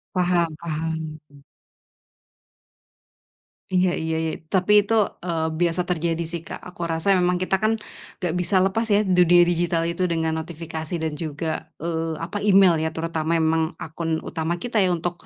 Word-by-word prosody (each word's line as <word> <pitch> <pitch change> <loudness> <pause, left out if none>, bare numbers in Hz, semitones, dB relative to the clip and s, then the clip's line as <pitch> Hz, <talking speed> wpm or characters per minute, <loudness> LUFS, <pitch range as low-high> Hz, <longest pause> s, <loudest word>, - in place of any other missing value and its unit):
Paham-paham. 160 -3 -1
Mhm. 145 -1 -18 2.3
Iya 180 -1 +2
iya 160 0 -2
iya, 160 -1 -1 0.2
tapi 205 +2 +5
itu, 225 - -1 0.3
eee, 165 -2 0
biasa 175 0 +2
terjadi 170 -1 0
sih, 165 0 -5
Kak. - - -7
Aku 175 -1 -5
rasa 170 +4 +2
memang 180 0 +1
kita 190 +1 +1
kan, 215 +3 +1 0.5
enggak 175 -3 -1
bisa 185 +1 +2
lepas 195 +5 +1
ya 205 - +5
dunia 180 -3 +5
digital 175 -1 +2
itu 170 +2 -1
dengan 160 -2 0
notifikasi 160 0 -6
dan 155 -2 -2
juga, 160 +1 -4
eee, 165 0 -2
apa, 170 +5 -4
email 190 -4 +6
ya. 160 0 -2
Terutama 165 0 -2
memang 160 +1 +1
akun 160 0 -3
utama 170 +1 -3
kita 240 -2 -2
ya 185 -3 +3
untuk, 175 +1 -4
170 Hz, 155 wpm, -23 LUFS, 160-180 Hz, 2.3 s, email